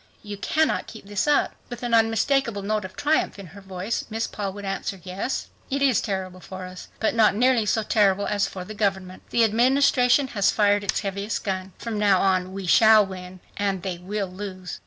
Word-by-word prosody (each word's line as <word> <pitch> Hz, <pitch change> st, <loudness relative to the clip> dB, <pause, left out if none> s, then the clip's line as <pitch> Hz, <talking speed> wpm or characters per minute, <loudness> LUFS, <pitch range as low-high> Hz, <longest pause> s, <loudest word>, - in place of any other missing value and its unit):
You 205 Hz, -1 st, -6 dB
cannot 315 Hz, +10 st, 0 dB
keep 220 Hz, -3 st, -11 dB
this 205 Hz, +6 st, -2 dB
up!" 295 Hz, -1 st, +2 dB, 0.2 s
With 245 Hz, 0 st, -8 dB
an 240 Hz, -1 st, -2 dB
unmistakable 225 Hz, 0 st, +2 dB
note 210 Hz, 0 st, -1 dB
of 185 Hz, -, -10 dB
triumph 300 Hz, -5 st, 0 dB
in 200 Hz, -, -9 dB
her 200 Hz, -, -11 dB
voice 190 Hz, +3 st, -4 dB
Miss 225 Hz, +1 st, -2 dB
Paul 200 Hz, -2 st, -4 dB
would 205 Hz, 0 st, -8 dB
answer, 195 Hz, 0 st, -3 dB
"Yes, 190 Hz, +8 st, -4 dB, 0.2 s
it 275 Hz, 0 st, 0 dB
is 265 Hz, -5 st, +3 dB
terrible 190 Hz, -3 st, -4 dB
for 185 Hz, 0 st, -8 dB
us, 185 Hz, 0 st, -10 dB
but 220 Hz, -, +1 dB
not 220 Hz, -3 st, +4 dB
nearly 245 Hz, -1 st, +3 dB
so 220 Hz, +2 st, +1 dB
terrible 205 Hz, -2 st, +2 dB
as 205 Hz, -1 st, 0 dB
for 185 Hz, -1 st, -7 dB
the 215 Hz, -, -8 dB
government. 195 Hz, -3 st, -2 dB
The 235 Hz, -, +3 dB
Administration 250 Hz, +3 st, +3 dB
has 200 Hz, -4 st, +2 dB
fired 205 Hz, -1 st, +2 dB
its 200 Hz, -, -1 dB
heaviest 200 Hz, +2 st, -3 dB
gun. 190 Hz, -1 st, -3 dB
From 225 Hz, -3 st, -4 dB
now 200 Hz, -3 st, +4 dB
on 185 Hz, -1 st, +1 dB
we 195 Hz, 0 st, -6 dB
shall 220 Hz, +3 st, +6 dB
win 185 Hz, -1 st, -9 dB, 0.2 s
and 195 Hz, -3 st, -1 dB
they 185 Hz, -3 st, -4 dB
will 200 Hz, +3 st, -3 dB
lose." 185 Hz, -1 st, -7 dB
205 Hz, 200 wpm, -24 LUFS, 190-225 Hz, 0.2 s, shall